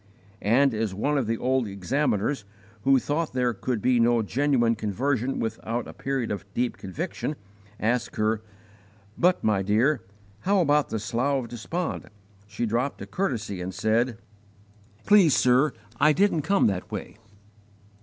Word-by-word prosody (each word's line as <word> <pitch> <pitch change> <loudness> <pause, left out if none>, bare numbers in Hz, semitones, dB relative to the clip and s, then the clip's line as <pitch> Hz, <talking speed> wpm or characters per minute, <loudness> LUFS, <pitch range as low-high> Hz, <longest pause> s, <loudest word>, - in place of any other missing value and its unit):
And 125 +5 +3
as 110 -3 -2
one 145 +9 0
of 125 - -2
the 115 0 0
old 130 -1 +1
examiners, 110 +4 -1 0.4
who 135 0 +6
thought 150 +4 -1
there 125 -2 +1
could 115 +1 -3
be 125 -1 +3
no 115 -1 +3
genuine 125 0 +2
conversion 120 +5 -1
without 115 +1 -3
a - - -9
period 135 -3 -2
of 100 -3 -3
deep 120 0 0
conviction, 150 - -4 0.4
asked 120 +3 0
her, 110 0 +1 0.7
"But, 180 +1 +2
my 105 -3 +2
dear, 110 +7 +2 0.4
how 195 - +2
about 150 -3 +3
the - - -2
Slough 130 +6 0
of 115 - -9
Despond?" 160 +9 -4 0.4
she 105 +3 -3
dropped 120 +5 -1
a - - -6
courtesy 110 - -2
and 90 +1 -5
said, 110 +3 +1 0.9
"_Please, 195 -8 +6
sir, 130 +4 +4 0.3
I 150 +1 +5
didn't 185 -1 +2
come 195 +6 +2
that 95 -3 -1
way! - - -6
120 Hz, 150 wpm, -26 LUFS, 110-145 Hz, 0.9 s, who